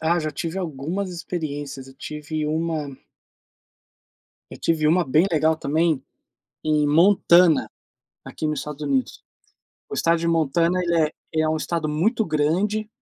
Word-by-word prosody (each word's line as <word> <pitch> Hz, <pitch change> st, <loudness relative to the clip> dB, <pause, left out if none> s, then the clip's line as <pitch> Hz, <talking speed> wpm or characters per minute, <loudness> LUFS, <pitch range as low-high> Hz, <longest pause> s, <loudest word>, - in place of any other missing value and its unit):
ah, 170 Hz, +2 st, +2 dB
já 155 Hz, -1 st, -2 dB
tive 165 Hz, +5 st, -4 dB
algumas 175 Hz, +4 st, -3 dB
experiências, 145 Hz, -6 st, -5 dB
eu 135 Hz, -, -14 dB
tive 150 Hz, +1 st, -5 dB
uma 155 Hz, -3 st, -2 dB, 1.5 s
eu -, -, -10 dB
tive 155 Hz, -2 st, +1 dB
uma 175 Hz, +2 st, +3 dB
bem 155 Hz, +8 st, +4 dB
legal 160 Hz, 0 st, +2 dB
também, 160 Hz, -1 st, 0 dB, 0.6 s
em 150 Hz, -1 st, +2 dB
Montana, 170 Hz, 0 st, +5 dB, 0.5 s
aqui 155 Hz, -, -4 dB
no 150 Hz, -, 0 dB
Estados 150 Hz, +1 st, -6 dB
Unidos. 140 Hz, -3 st, -1 dB, 0.7 s
O -, -, -7 dB
Estado 165 Hz, 0 st, +2 dB
de 170 Hz, -, -1 dB
Montana, 165 Hz, +2 st, +2 dB
ele 170 Hz, -1 st, +1 dB
é -, -, -11 dB, 0.3 s
é 155 Hz, 0 st, +2 dB
um 155 Hz, -, 0 dB
Estado 155 Hz, 0 st, -2 dB
muito 215 Hz, +10 st, +1 dB
grande 185 Hz, +8 st, 0 dB
160 Hz, 145 wpm, -23 LUFS, 150-170 Hz, 1.5 s, Montana